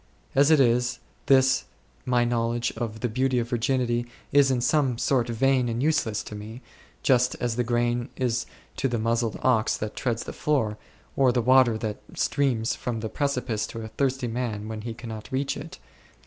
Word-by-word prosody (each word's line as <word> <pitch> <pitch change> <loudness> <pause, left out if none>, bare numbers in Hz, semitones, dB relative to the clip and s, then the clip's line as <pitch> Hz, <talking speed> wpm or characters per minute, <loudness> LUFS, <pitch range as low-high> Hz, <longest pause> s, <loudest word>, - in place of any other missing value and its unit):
As 140 +2 +5
it 155 -2 +6
is, 125 -1 +3 0.3
this 130 -1 +4 0.4
my 120 -1 +3
knowledge 120 0 0
of 110 -2 -4
the 125 - +1
beauty 130 +3 0
of 120 -1 0
virginity 120 -1 0 0.2
is 140 -1 +5
in 130 -2 +1
some 130 -1 +2
sort 125 -1 +1
vain 125 +1 +2
and 115 +3 -2
useless 120 -9 +1
to - - -9
me, 110 +4 -8 0.4
just 125 -2 +3
as 120 -2 -2
the 125 - +1
corn 120 +1 0
is 125 -2 -1 0.3
to - - +1
the 120 -2 -1
muzzled 115 0 0
ox 115 -4 +2
that 105 0 -5
treads 120 -3 -1
8 - - -17
the - - -6
floor, 115 -8 0 0.4
or 135 -2 +4
the 120 - +1
water 130 -2 +5
that 110 -2 -4
streams 125 -6 +1
from 115 -3 -4
the 110 - -3
precipice 125 -7 -1
to 115 - -7
a 110 - -7
thirsty 130 +1 -1
man 115 -3 -3
when 110 -1 -5
he 115 +1 -5
cannot 110 -2 -8
reach 135 +1 -1
it. - - -8
120 Hz, 190 wpm, -26 LUFS, 115-130 Hz, 0.4 s, it